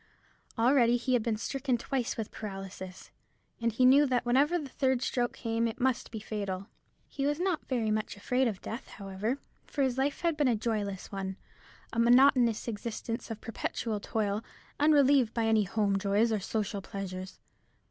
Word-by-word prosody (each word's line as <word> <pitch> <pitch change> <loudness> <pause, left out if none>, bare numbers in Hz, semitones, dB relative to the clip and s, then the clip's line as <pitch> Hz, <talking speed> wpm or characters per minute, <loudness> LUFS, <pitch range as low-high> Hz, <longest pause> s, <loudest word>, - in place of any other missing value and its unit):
Already 240 0 +4
he 255 +2 -1
had 245 - +4
been 220 -1 -1
stricken 265 +2 -1
twice 250 +1 -2
with 220 -2 -4
paralysis, 195 -2 -8 0.5
and 230 0 +2
he 250 +4 +3
knew 280 +3 +7
that 245 -2 +1
whenever 280 +8 +3
the 300 -5 -5
third 260 -1 0
stroke 240 -1 0
came 230 -1 -1
it 225 - -5
must 260 -1 0
be 220 - -6
fatal. 200 -3 -4 0.4
He 275 0 -2
was 295 +2 0
not 360 -3 -1
very 230 -5 0
much 215 -1 -2
afraid 250 +5 +1
of 205 -5 -4
death, 230 +4 -6
however; 200 +5 -3 0.3
for 285 - -1
his 260 -1 0
life 280 +4 0
had 335 -2 +1
been 295 -2 +2
a 240 - +3
joyless 210 -3 -3
one, 190 -1 -4 0.6
a 230 - -1
monotonous 245 -1 +5
existence 230 +1 -4
of 225 -1 -6
perpetual 225 -1 -3
toil, 210 0 -1 0.4
unrelieved 280 -5 +4
by 230 -1 +1
any 220 -2 +3
home 200 0 +1
joys 205 +3 +2
or 215 - +1
social 200 0 -2
pleasures. 190 -1 -6
230 Hz, 175 wpm, -30 LUFS, 210-260 Hz, 0.6 s, knew